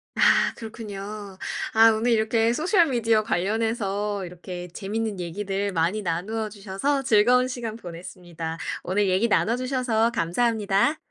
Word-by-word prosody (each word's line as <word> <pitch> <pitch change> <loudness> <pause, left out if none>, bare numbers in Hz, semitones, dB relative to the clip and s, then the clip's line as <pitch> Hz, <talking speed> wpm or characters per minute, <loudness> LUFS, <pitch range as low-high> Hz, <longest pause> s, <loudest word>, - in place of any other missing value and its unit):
아 - - +4
그렇군요. 210 -3 -8 0.4
아 225 +1 +7
오늘 225 +2 +1
이렇게 225 +1 +2
소셜 340 - +3
미디어 230 -4 +2
관련해서 205 0 -1
이렇게 180 0 -8
재밌는 205 +3 -4
얘기들 195 +3 -3
많이 175 +6 0
나누어 205 +6 -2
주셔서 205 +7 -2
즐거운 250 +2 +4
시간 240 -4 -5
보냈습니다. 170 -3 -7 0.3
오늘 195 +2 +1
얘기 190 +5 +2
나눠 230 +1 +2
주셔서 250 -3 0
감사합니다. 220 - +1
215 Hz, 330 characters per minute, -25 LUFS, 190-230 Hz, 0.4 s, 아